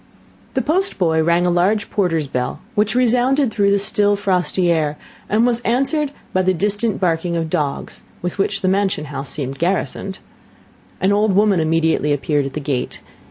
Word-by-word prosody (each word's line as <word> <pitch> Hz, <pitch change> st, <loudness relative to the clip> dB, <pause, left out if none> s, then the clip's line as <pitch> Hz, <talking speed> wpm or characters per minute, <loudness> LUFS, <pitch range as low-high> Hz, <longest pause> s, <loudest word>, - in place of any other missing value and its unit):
The -, -, +1 dB
post 370 Hz, +6 st, 0 dB
boy 160 Hz, -3 st, +2 dB
rang 170 Hz, +2 st, +2 dB
a 175 Hz, -, +2 dB
large 195 Hz, +5 st, +1 dB
porter's 165 Hz, -6 st, 0 dB
bell, 125 Hz, -2 st, -3 dB
which 215 Hz, 0 st, +1 dB
resounded 250 Hz, +2 st, +2 dB
through 200 Hz, -2 st, +2 dB
the 200 Hz, -, +3 dB
still, 205 Hz, 0 st, +2 dB
frosty 185 Hz, -2 st, +1 dB
air, 150 Hz, -3 st, 0 dB, 0.3 s
and 220 Hz, +3 st, +3 dB
was 240 Hz, -1 st, +2 dB
answered 275 Hz, +5 st, 0 dB, 0.2 s
by 185 Hz, -, +2 dB
the 185 Hz, 0 st, +1 dB
distant 205 Hz, +4 st, 0 dB
barking 170 Hz, -1 st, 0 dB
of 165 Hz, -1 st, -2 dB
dogs, 145 Hz, -2 st, -3 dB, 0.2 s
with 180 Hz, +3 st, -4 dB
which 195 Hz, 0 st, 0 dB
the 185 Hz, -, 0 dB
mansion 195 Hz, -4 st, +1 dB
house 135 Hz, 0 st, -4 dB
seemed 135 Hz, -2 st, -4 dB
garrisoned. 190 Hz, +2 st, -1 dB, 0.8 s
An 190 Hz, -, +2 dB
old 205 Hz, -1 st, +2 dB
woman 205 Hz, -2 st, +3 dB
immediately 160 Hz, -2 st, +1 dB
appeared 145 Hz, 0 st, 0 dB
at 135 Hz, -, -8 dB
the 155 Hz, -, -3 dB
gate. 140 Hz, -3 st, -3 dB
185 Hz, 175 wpm, -19 LUFS, 160-210 Hz, 0.8 s, the